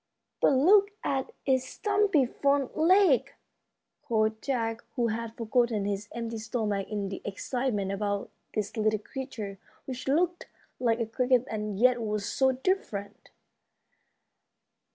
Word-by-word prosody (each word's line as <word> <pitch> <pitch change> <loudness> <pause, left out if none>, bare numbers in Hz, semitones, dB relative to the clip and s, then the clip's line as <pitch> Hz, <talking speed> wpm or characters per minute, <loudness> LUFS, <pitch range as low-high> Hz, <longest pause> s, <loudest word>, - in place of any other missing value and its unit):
"But - - +5
look 390 +10 +6
at 270 -1 -1
its 260 -2 +3
stumpy 400 -9 +2
front 280 +1 0
legs!" 335 - +4 0.7
called 220 -1 0
Jack, 230 -4 -2
who 240 -3 +1
had 225 +1 -4
forgotten 230 -2 +1
his 205 0 -3
empty 230 -1 -4
stomach 215 -3 -2
in 205 -2 -2
the 195 - -6
excitement 205 -1 -2
about 200 0 -2 0.2
this 210 0 -2
little 215 -1 +2
creature, 215 -4 -7 0.3
which 260 -1 -6
looked 345 +5 +1 0.3
like 235 -2 +2
a 230 - +1
cricket 250 +2 +2
and 210 -2 -3
yet 245 +2 +4
was 210 -2 -2
so 265 +3 +2
different. 255 - -3
235 Hz, 130 wpm, -28 LUFS, 210-265 Hz, 0.7 s, look